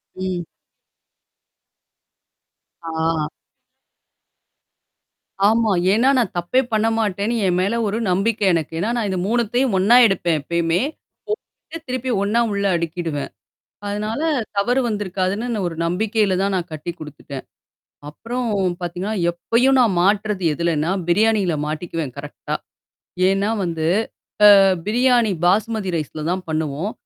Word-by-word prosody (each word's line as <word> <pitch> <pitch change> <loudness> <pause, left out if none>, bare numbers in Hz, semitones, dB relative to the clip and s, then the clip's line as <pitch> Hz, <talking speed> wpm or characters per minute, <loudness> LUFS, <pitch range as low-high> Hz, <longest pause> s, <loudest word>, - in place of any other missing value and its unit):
ம். 185 -1 -3 2.4
ஆ. 160 -1 -1 2.2
ஆமா. 225 -1 +2 0.2
ஏன்னா, 235 +5 +3
நான் 230 -7 0
தப்பே 175 +10 +2
பண்ண 220 +1 +2
மாட்டேன்னு 210 +2 -1
என் 180 -1 +2
மேல 200 +5 0
ஒரு 205 - -1
நம்பிக்கை 205 +3 +1
எனக்கு. 160 -1 -1
ஏன்னா 205 +6 -1
நான் 225 -3 -1
இந்த 185 -1 -1
3த்தயும் 240 +1 +1
ஒண்ணா 200 +6 +5
எடுப்பேன் 175 -5 0
எப்பயுமே. 170 +3 0 0.5
போட்டுட்டு 420 -6 -7
திருப்பி 255 0 -2
ஒண்ணா 215 +4 +2
உள்ள 200 0 -1
அடுக்கிடுவேன். 165 -3 -3 0.6
அதுனால 210 +5 -3 0.4
தவறு 240 +6 +2
வந்திருக்காதுன்னு 200 +1 -2
நான் 205 -4 -2
ஒரு 165 - -5
நம்பிக்கையில 205 +2 +1
தான் 200 0 0
நான் 175 -1 -4
கட்டி 155 +3 -5
குடுத்துட்டேன். 140 -3 -8 0.7
அப்புறம் 240 +11 -4 0.3
பாத்தீங்கன்னா, 180 +4 -3 0.2
எப்பயும் 240 +10 +2
நான் 220 -7 +3
மாட்டுறது 200 -1 +1
எதுலன்னா, 165 0 0 0.2
பிரியாணில 205 -1 +2
மாட்டிக்குவேன் 155 -3 -4
கரெக்ட்டா. 145 +1 -6 0.7
ஏன்னா 195 +2 +1
வந்து 165 -2 -3 0.8
அ - - +7 0.3
பிரியாணி 240 0 +3
பாஸ்மதி 205 +2 +1
ரைஸ்ல 155 0 -4
தான் 185 +1 -2
பண்ணுவோம். 155 +5 -2
195 Hz, 115 wpm, -21 LUFS, 170-220 Hz, 2.4 s, அ